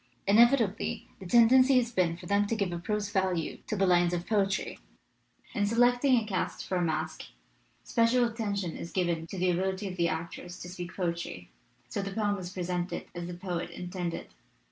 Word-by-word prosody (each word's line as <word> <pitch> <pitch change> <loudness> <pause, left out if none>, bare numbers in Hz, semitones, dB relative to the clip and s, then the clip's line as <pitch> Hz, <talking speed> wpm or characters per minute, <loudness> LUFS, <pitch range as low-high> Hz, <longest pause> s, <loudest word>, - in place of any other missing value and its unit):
Inevitably 225 0 +3
the 190 - -8
tendency 255 +5 +6
has 240 -1 +1
been 175 -6 +1
for - - -11
them 200 +1 +2
to 230 - 0
give 200 -4 -1
a 170 - -3
prose 210 +2 -2
value 190 -5 0
to 215 - -1
the 195 -1 +2
lines 175 -1 +3
of 175 0 -4
poetry. 200 -3 0 0.7
In 205 -4 +1
selecting 245 +3 +4
a 220 - -5
cast 195 -3 -2
for 185 - -1
a - - +1
masque, 160 -2 -2 0.6
special 240 +1 +3
attention 205 -7 -2
is 170 - -7
given 170 -3 -1
to 190 - -7
the 180 0 +2
ability 190 +3 -1
of 185 -1 -6
the 170 -1 +2
actors 170 +2 -5
to 180 - -7
speak 180 0 -7
poetry, 170 - -3 0.4
so 125 +11 -3
the 195 - -4
poem 205 -1 +1
is 175 -1 -6
presented 180 -1 -3
as 175 0 -5
the 175 - -6
poet 175 -1 -4
intended. 175 0 -5
190 Hz, 190 wpm, -29 LUFS, 175-215 Hz, 0.7 s, tendency